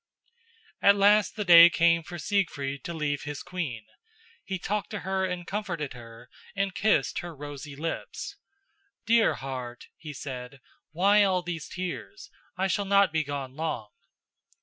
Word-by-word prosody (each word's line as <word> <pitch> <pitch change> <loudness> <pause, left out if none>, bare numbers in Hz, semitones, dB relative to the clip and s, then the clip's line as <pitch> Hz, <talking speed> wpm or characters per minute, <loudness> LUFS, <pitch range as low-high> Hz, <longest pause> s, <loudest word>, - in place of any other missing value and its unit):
At 200 - +6
last 205 +1 +4
the 210 - -3
day 170 -1 +10
came 170 -1 +3
for 175 +2 -8
Siegfried 140 -7 -1
to 170 - -4
leave 145 -2 -1
his 150 -1 -6
queen. 140 -12 -5 0.6
He 190 - -3
talked 205 +3 -3
to - - -5
her 190 0 -1
and 180 -1 -4
comforted 175 -8 -4
her 115 -2 -12 0.3
and 195 -1 -1
kissed 200 -10 +1
her 175 -2 -7
rosy 145 0 -8
lips. 160 +3 -5 0.7
"Dear 230 0 +4
heart," 130 -3 -7
he 155 -3 -9
said, 130 -1 -7 0.3
"why 200 +6 +4
all 185 -2 +1
these 170 -4 -5
tears? 185 - -6 0.3
I 190 - +1
shall 200 +1 0
not 200 -3 +4
be 160 -1 +1
gone 140 -2 -5
long." 155 -9 -3
170 Hz, 150 wpm, -27 LUFS, 140-195 Hz, 0.7 s, day